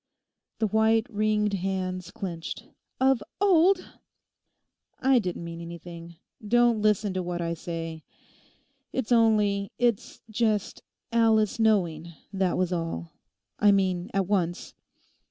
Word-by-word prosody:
The 225 - +1
white, 220 +1 +3
ringed 210 -1 +1
hands 185 -1 -2
clenched, 175 -3 -6 0.3
'"Of 265 -3 +3 0.2
old!"' 375 -1 +4 1.1
'I 265 -1 +4
didn't 180 -5 -4
mean 170 0 -7
anything. 170 0 -9 0.3
Don't 240 -1 +3
listen 210 -1 +2
to 185 - -1
what 175 -1 -4
I 170 -1 -1
say. 165 -1 -6 0.9
It's 260 -2 -3
only—it's 215 0 +1
just 215 -2 0 0.3
Alice 225 -1 +3
knowing, 170 -7 +1 0.2
that 190 -2 0
was 185 0 0
all; 165 - -4 0.5
I 205 -1 +6
mean 185 -3 +1
at 195 -1 0
once. 175 -3 -1
200 Hz, 115 wpm, -27 LUFS, 175-220 Hz, 1.1 s, I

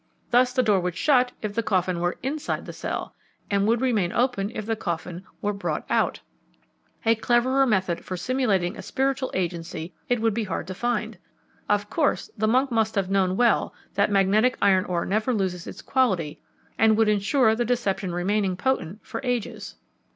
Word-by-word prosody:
Thus 250 +1 +4
the 255 0 +2
door 210 -4 +3
would 180 -1 -3
shut 255 -4 +3
if 210 -1 -2
the 230 - 0
coffin 185 -4 0
were 175 +1 -1
inside 290 +3 -3
the - - -8
cell, - - -4 0.4
and 200 0 +2
would 230 +1 +2
remain 215 -9 +1
open 235 -5 0
if 215 - -4
the 225 +1 0
coffin 175 -2 -4 0.2
were 205 0 +1
brought 200 - -3
out. - - +1 0.8
A 225 - +5
cleverer 250 +4 +2
method 190 -6 0
for 185 - -5
simulating 210 -6 0
a - - -7
spiritual 265 0 -1
agency 170 -2 -3 0.2
it 245 -1 +2
would 225 -1 +1
be 225 0 -1
hard 190 - -3
to 185 - -6
find. 225 -1 -2 0.5
Of 205 0 +2
course, 310 -4 0
the 215 -1 0
monk 260 +4 +2
must 220 -1 +1
have 195 -1 0
known 190 -1 +2
well 240 -3 +2 0.2
that 200 +2 +2
magnetic 205 +5 +3
iron 190 -1 +4
ore 175 -3 -1
never 215 +5 0
loses 185 -4 -2
its - - -9
quality 190 - 0 0.4
and 220 0 +5
would 225 -1 +4
ensure 220 +3 +3
the 235 +2 0
deception 210 -6 -1
remaining 190 +1 0
potent 210 -6 -2
for 225 - -5
ages." 245 -4 -3
210 Hz, 180 wpm, -25 LUFS, 185-245 Hz, 0.8 s, A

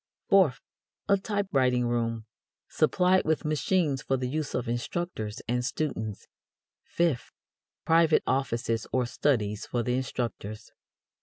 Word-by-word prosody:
Fourth, 175 -9 +5 0.5
a 200 - +5
typewriting 145 - +1
room, 115 -2 -1 0.4
supplied 185 +1 +3
with 160 0 0
machines 150 -1 +1
for 135 - 0
the 130 - -3
use 150 +2 -3
of 125 - -2
instructors 120 -2 -3
and 125 +1 0
students. 120 -6 -3 0.6
Fifth, 165 -8 -1 0.5
private 165 -1 +4
offices 115 -4 -1
or 130 -1 +1
studies 110 -5 0
for 120 -1 -1
the 125 - 0
instructors. 120 -5 -4
130 Hz, 120 wpm, -28 LUFS, 120-155 Hz, 0.6 s, Fourth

